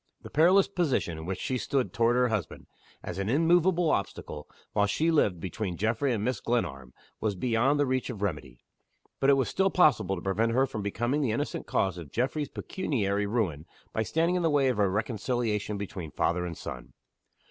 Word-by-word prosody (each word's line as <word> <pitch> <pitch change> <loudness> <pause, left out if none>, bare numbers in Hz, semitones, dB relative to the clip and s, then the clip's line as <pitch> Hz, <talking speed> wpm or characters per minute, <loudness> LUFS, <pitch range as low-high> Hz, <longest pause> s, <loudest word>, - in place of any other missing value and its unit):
The - - -10
perilous 180 +6 +5
position 140 - -1
in 80 - -7
which 95 - -3
she 130 -1 -2
stood 135 0 -1
toward 115 +1 +3
her 125 0 +3
husband 105 -9 -3 0.4
as 90 - -5
an 100 +1 -1
immovable 170 +4 +3
obstacle, 75 -6 -3 0.2
while 105 -1 +3
she 160 +11 +1
lived, 105 - +2
between 95 0 -4
Geoffrey 115 - 0
and 110 -1 -1
Mrs. 130 - -1
Glenarm 75 - -2 0.3
was 105 -2 -1
beyond 125 +7 +1
the 145 - +3
reach 130 0 -1
of 105 -5 -5
remedy. 75 -10 -4 0.6
But 135 - +3
it 140 - +6
was 135 - +1
still 195 0 +2
possible 110 - +3
to 85 - -7
prevent 110 +4 +1
her 130 +3 +4
from 125 -5 -5
becoming 120 +8 -1
the 135 - +1
innocent - - -3
cause 95 -2 0
of 75 -5 -10
Geoffrey's 135 +4 -1
pecuniary 105 - -1
ruin, 95 -9 -1 0.3
by 110 - 0
standing 165 +9 +1
in 180 - +1
the 165 - +2
way 140 -3 +3
of 120 -4 -1
a 100 -2 +3
reconciliation 110 0 -1
between 95 -5 -6
father 90 +4 0
and 85 - -7
son. 60 0 -8
115 Hz, 195 wpm, -28 LUFS, 95-135 Hz, 0.6 s, it